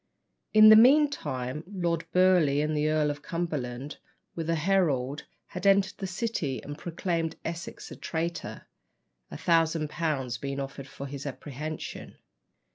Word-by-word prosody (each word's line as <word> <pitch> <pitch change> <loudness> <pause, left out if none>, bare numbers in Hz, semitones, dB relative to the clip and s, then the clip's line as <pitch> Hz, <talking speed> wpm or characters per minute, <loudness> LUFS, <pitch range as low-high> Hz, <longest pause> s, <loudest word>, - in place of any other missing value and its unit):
In 215 0 +8
the 215 - +10
meantime 220 - +3
Lord 170 -4 -2
Burleigh 180 -6 +4
and 155 0 -1
the 150 +1 +1
Earl 155 -1 +2
of 145 0 -8
Cumberland, 145 -5 -4 0.4
with 165 -1 -4
a 165 - +2
herald, 150 -6 +1 0.2
had 180 +2 -2
entered 195 -1 +3
the 195 - -3
City 185 - -2
and 145 - -6
proclaimed 165 0 -2
Essex 170 +1 -6
a - - -7
traitor; 170 +1 -4 0.6
a - - -7
thousand 165 -2 +1
pounds 135 -8 -2
being 140 +1 -4
offered 140 0 -6
for 140 - -8
his 140 +1 -6
apprehension. 150 +3 -6
160 Hz, 140 wpm, -28 LUFS, 140-180 Hz, 0.6 s, the